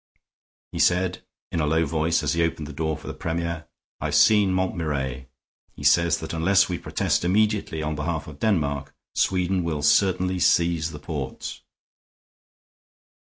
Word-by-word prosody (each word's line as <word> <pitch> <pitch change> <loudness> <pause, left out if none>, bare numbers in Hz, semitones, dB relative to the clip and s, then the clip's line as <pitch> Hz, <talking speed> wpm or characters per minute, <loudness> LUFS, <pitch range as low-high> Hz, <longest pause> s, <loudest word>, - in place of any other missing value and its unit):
He - - -5
said, 90 +1 +2 0.3
in 85 - -1
a 75 - +1
low 80 +2 +2
voice 80 +2 0
as 75 - +1
he 85 - +1
opened 80 -2 -2
the 75 - -8
door 80 +1 -2
for - - -15
the - - -5
Premier, 85 0 -3 0.3
"I - - -4
have - - -1
seen 105 -3 +5
Montmirail; 75 -8 -2 0.5
he - - -10
says 85 +3 +4
that - - -5
unless 85 +4 +3
we 90 -2 -3
protest - - -1
immediately 100 -3 +1
on 75 0 -2
behalf 75 +1 -3
of 75 -2 -11
Denmark, 70 -9 0 0.2
Sweden 90 0 +1
will 75 -3 -2
certainly 95 0 +3
seize 85 -2 +2
the 75 - -8
ports." 75 -3 -6
85 Hz, 160 wpm, -24 LUFS, 75-90 Hz, 0.5 s, seen